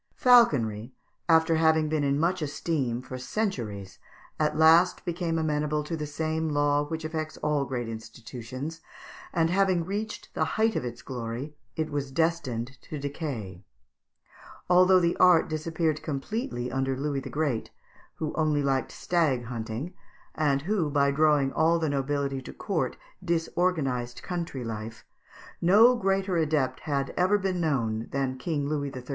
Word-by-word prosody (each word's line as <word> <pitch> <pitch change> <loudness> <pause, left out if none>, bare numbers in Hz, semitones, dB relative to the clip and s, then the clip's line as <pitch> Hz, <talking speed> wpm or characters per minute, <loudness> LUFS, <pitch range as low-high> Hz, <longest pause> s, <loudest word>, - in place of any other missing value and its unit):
Falconry, 130 - +4 0.3
after 160 0 +4
having 160 -1 +3
been 155 -1 0
in 140 0 +1
much 175 +3 +1
esteem 140 -5 -2
for 130 -1 -7
centuries, 115 - -3 0.4
at 155 -1 +1
last 165 +3 +5
became 170 -1 -1
amenable 150 -1 0
to 165 +3 -4
the 150 -2 -4
same 160 +2 -2
law 145 0 +2
which 160 +2 -5
affects 155 -1 -4
all 150 -2 +1
great 125 -3 -3
institutions, 120 +6 -7 0.5
and, 165 0 +1
having 185 -3 +2
reached 210 +3 -5
the - - 0
height 220 0 +2
of - - -1
its 120 -1 -6
glory, 125 +3 -5 0.2
it 155 -1 -2
was 145 -2 -2
destined 135 -6 -1
to 155 - -7
decay. 140 - -5 1.1
Although 185 +1 +6
the 170 -1 +1
art 180 -3 +6
disappeared 155 0 -1
completely 135 - -3
under 135 0 -1
Louis 140 0 -1
the 135 - -7
Great, 145 -7 -1 0.5
who 155 - -3
only 155 -2 +1
liked 135 -1 0
stag 150 -9 0
kunting, 115 +7 -5 0.4
and 140 -3 +1
who, 185 -4 0
by 140 -1 +3
drawing 145 -2 +3
all 165 +3 +3
the 160 -2 0
nobility 140 -1 -1
to - - -9
court, 195 -6 -2 0.3
disorganized 165 -8 -1
country 170 -8 -4
life, 115 0 -6 0.6
no 215 +8 +6
greater 195 -3 0
adept 145 -5 +1
had 140 -2 -2
ever 185 +3 +3
been 190 -3 -1
known 115 -8 0
than 135 -1 -2
King 145 0 -2
Louis 145 -2 -2
XIII. 130 -1 -8
150 Hz, 150 wpm, -27 LUFS, 130-165 Hz, 1.1 s, Although